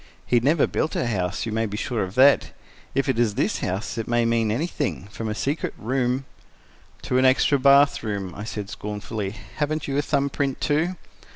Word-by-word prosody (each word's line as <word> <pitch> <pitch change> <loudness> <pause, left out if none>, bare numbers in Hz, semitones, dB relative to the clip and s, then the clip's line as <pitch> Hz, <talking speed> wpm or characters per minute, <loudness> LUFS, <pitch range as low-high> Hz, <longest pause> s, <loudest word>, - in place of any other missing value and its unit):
He 120 - +3
never 145 +6 +3
built 160 - -2
a - - 0
house, 95 -6 -1
you 115 - -3
may 110 +1 0
be 105 0 -5
sure 115 0 -2
of 95 0 -6
that. 140 +2 +5 0.4
If 135 +1 +1
it 130 -3 +1
is 110 -4 +2
this 145 - 0
house, 100 +5 -3
it 115 - -3
may 120 0 +2
mean 115 -1 +2
anything, 145 - -2
from 110 +1 -4
a 105 - -2
secret 140 +7 -2
room—" 125 +2 -1 0.8
"To 130 - +1
an 130 - +3
extra 135 +2 +4
bath 140 +2 +5
room," 100 -5 -4
I 105 - -7
said 105 -3 -5
scornfully. 105 -1 -5 0.2
"Haven't 155 0 -1
you 140 0 0
a - - +3
thumb 140 -1 0
print, 135 -2 -1
too?" 160 +5 +1
125 Hz, 200 wpm, -24 LUFS, 110-140 Hz, 0.8 s, that